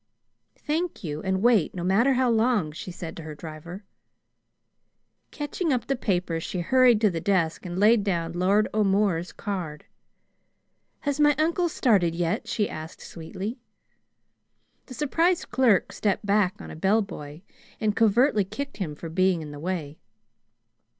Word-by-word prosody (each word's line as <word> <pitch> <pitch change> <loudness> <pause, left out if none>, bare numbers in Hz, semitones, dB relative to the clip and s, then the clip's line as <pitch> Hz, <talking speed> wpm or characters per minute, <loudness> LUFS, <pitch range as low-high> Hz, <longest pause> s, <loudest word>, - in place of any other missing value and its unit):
"Thank 320 -2 -3
you; 150 -2 -4
and 190 +1 -1
wait, 230 -9 +3
no 175 - -4
matter 215 +9 +3
how 255 0 +2
long," 225 -7 +2
she 160 - -8
said 175 -2 -7
to - - -6
her 155 -1 -8
driver. 165 +5 -9 1.5
Catching 300 +3 -3
up 250 -3 0
the 275 - 0
paper, 180 -8 -1
she 175 +2 -4
hurried 250 +3 +4
to 210 -3 +4
the 165 -2 -3
desk 180 -3 0
and 175 0 -5
laid 215 +1 +5
down 170 -4 -1
Lord 195 +4 +2
O'More's 195 -4 +1
card. 175 -8 -5 1.2
"Has 285 0 -2
my 295 -1 +5
uncle 335 +3 +1
started 195 - +2
yet?" 170 0 -1
she 210 - 0
asked 155 +1 -8
sweetly. 190 - -6 1.3
The 255 - -9
surprised 330 +6 +1
clerk 240 -6 +3
stepped 205 0 -1
back 200 0 +2
on - - -9
a - - -8
bellboy, 175 -5 -1 0.4
and 215 -2 0
covertly 225 +1 +3
kicked 275 +8 -6
him 165 -7 -4
for 165 - -8
being 180 0 +1
in 150 - -8
the 145 - -9
way. 160 -3 -4
195 Hz, 150 wpm, -26 LUFS, 170-235 Hz, 1.5 s, laid